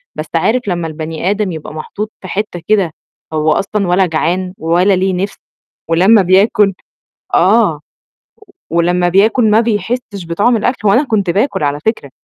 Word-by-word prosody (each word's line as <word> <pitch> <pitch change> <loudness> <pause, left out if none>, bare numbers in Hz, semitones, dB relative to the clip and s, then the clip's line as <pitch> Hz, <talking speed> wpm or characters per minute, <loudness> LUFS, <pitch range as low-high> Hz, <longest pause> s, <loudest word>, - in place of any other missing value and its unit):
بس - - -4
عارف 250 +3 +2
لمّا 175 -3 -2
البَني 160 +2 -4
آدم 205 -1 -1
يبقى 155 -2 -8
محطوط 205 +7 -6
في 185 - -8
حتّه 195 -3 -4
كده 200 -6 +2 0.4
هو 155 0 +1
أصلًا 200 +4 -1
ولا 180 +2 +3
جعان 180 +2 -1
ولا 175 +5 +2
ليه 190 +1 0
نِفْس 195 +3 -3 0.5
ولمّا 190 +6 +5
بياكل 195 +2 +3 0.6
آه، 190 -4 +3 0.9
ولمّا 175 +1 +1
بياكل 215 +5 +3
ما 215 +1 +5
بيحسّش 215 -3 -3
بطعم 205 +9 +1
الأكل، 220 0 -1
وأنا 245 +9 +4
كنت 205 -8 0
باكل 205 - 0
على 145 0 0
فكرة، 220 - -1
190 Hz, 150 wpm, -14 LUFS, 170-215 Hz, 0.9 s, ولمّا